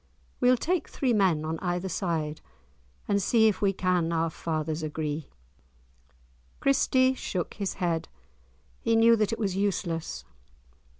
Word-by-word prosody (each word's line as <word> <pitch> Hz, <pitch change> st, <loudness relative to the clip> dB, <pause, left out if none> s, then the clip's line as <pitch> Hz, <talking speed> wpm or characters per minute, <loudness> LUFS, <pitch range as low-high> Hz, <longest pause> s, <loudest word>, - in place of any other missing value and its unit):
We'll 250 Hz, 0 st, +4 dB
take 350 Hz, +7 st, -1 dB
three 255 Hz, -3 st, 0 dB
men 185 Hz, -7 st, +2 dB
on 160 Hz, +1 st, -3 dB
either 180 Hz, 0 st, -2 dB
side, 165 Hz, -4 st, -2 dB, 0.7 s
And 200 Hz, 0 st, +2 dB
see 220 Hz, +3 st, +4 dB
if 215 Hz, 0 st, 0 dB
we 200 Hz, -1 st, +3 dB
can 180 Hz, -3 st, 0 dB
our 165 Hz, 0 st, 0 dB
fathers 155 Hz, -1 st, -3 dB
agree." 155 Hz, -1 st, -3 dB, 1.3 s
Christie 260 Hz, -1 st, +3 dB
shook 185 Hz, -8 st, -4 dB
his 200 Hz, -2 st, -3 dB
head. 170 Hz, -3 st, -1 dB, 0.7 s
He 230 Hz, -, +1 dB
knew 230 Hz, +1 st, +6 dB
that 215 Hz, -1 st, +1 dB
it 225 Hz, -, -2 dB
was 195 Hz, -4 st, -1 dB
useless. 170 Hz, -, -2 dB
185 Hz, 135 wpm, -27 LUFS, 165-220 Hz, 1.3 s, knew